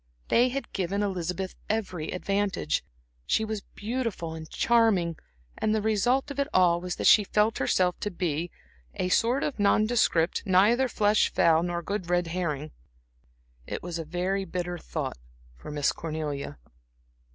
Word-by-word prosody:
They 245 Hz, +2 st, +4 dB
had 275 Hz, +2 st, -5 dB
given 195 Hz, +2 st, -1 dB
Elizabeth 185 Hz, -1 st, -3 dB, 0.2 s
every 185 Hz, -7 st, -2 dB
advantage, 195 Hz, -, -1 dB, 0.4 s
she 220 Hz, -, +2 dB
was 215 Hz, -1 st, -4 dB
beautiful 215 Hz, -7 st, -4 dB
and 160 Hz, -1 st, -8 dB
charming; 220 Hz, -8 st, +2 dB, 0.4 s
and 215 Hz, -, +1 dB
the 215 Hz, -, +1 dB
result 240 Hz, +6 st, +1 dB
of 280 Hz, -, -6 dB
it 280 Hz, -, +1 dB
all 175 Hz, -2 st, +4 dB
was 180 Hz, 0 st, -3 dB
that -, -, -4 dB
she 210 Hz, -, +7 dB
felt 210 Hz, +2 st, +1 dB
herself 180 Hz, +6 st, +1 dB
to 210 Hz, -, -2 dB
be 175 Hz, -3 st, -2 dB, 0.5 s
"a 180 Hz, -, -1 dB
sort 240 Hz, +8 st, +2 dB
of 285 Hz, -, -3 dB
nondescript, 205 Hz, -5 st, +2 dB
neither 215 Hz, +7 st, +4 dB
flesh, 210 Hz, -2 st, +2 dB
fowl, 165 Hz, -1 st, +4 dB
nor 175 Hz, 0 st, -2 dB
good 190 Hz, -1 st, -3 dB
red 175 Hz, 0 st, +2 dB
herring." 155 Hz, -4 st, -3 dB, 1.0 s
It -, -, -5 dB
was 170 Hz, -1 st, -4 dB
a -, -, -3 dB
very 180 Hz, +4 st, -1 dB
bitter 175 Hz, -1 st, -4 dB
thought -, -, -5 dB, 0.4 s
for -, -, -11 dB
Miss 145 Hz, -1 st, +1 dB
Cornelia. 150 Hz, -, -4 dB
185 Hz, 150 wpm, -27 LUFS, 170-215 Hz, 1.0 s, she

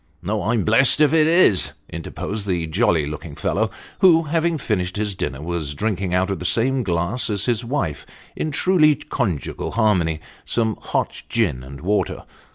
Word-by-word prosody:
" 75 Hz, -, -39 dB
No; 105 Hz, +3 st, -1 dB
I'm 110 Hz, +2 st, 0 dB
blessed 120 Hz, +6 st, +5 dB
if 150 Hz, -1 st, +4 dB
it 155 Hz, -1 st, +4 dB
is," 105 Hz, -, +4 dB
interposed 100 Hz, +5 st, -5 dB
the 90 Hz, -3 st, 0 dB
jolly 85 Hz, -2 st, +1 dB
looking 75 Hz, 0 st, -7 dB
fellow, 110 Hz, +6 st, 0 dB, 0.3 s
who, 170 Hz, -4 st, +6 dB
having 165 Hz, +2 st, 0 dB
finished 90 Hz, -8 st, -2 dB
his 105 Hz, -1 st, -1 dB
dinner, 70 Hz, -5 st, -4 dB
was 80 Hz, -4 st, -3 dB
drinking 100 Hz, 0 st, -2 dB
out 95 Hz, +2 st, +1 dB
of 95 Hz, -, -3 dB
the -, -, -6 dB
same 125 Hz, +8 st, +2 dB
glass 90 Hz, +5 st, -1 dB
as 100 Hz, -2 st, -1 dB
his 120 Hz, -1 st, 0 dB
wife, 115 Hz, -, -3 dB, 0.3 s
in 155 Hz, -, -2 dB
truly 155 Hz, -1 st, +3 dB
conjugal 120 Hz, -, -3 dB
harmony, 90 Hz, -8 st, +2 dB, 0.2 s
some 110 Hz, -2 st, 0 dB
hot -, -, -2 dB
gin 95 Hz, -, 0 dB
and 70 Hz, +2 st, -10 dB
water. 100 Hz, +5 st, -1 dB
105 Hz, 170 wpm, -21 LUFS, 85-125 Hz, 0.3 s, who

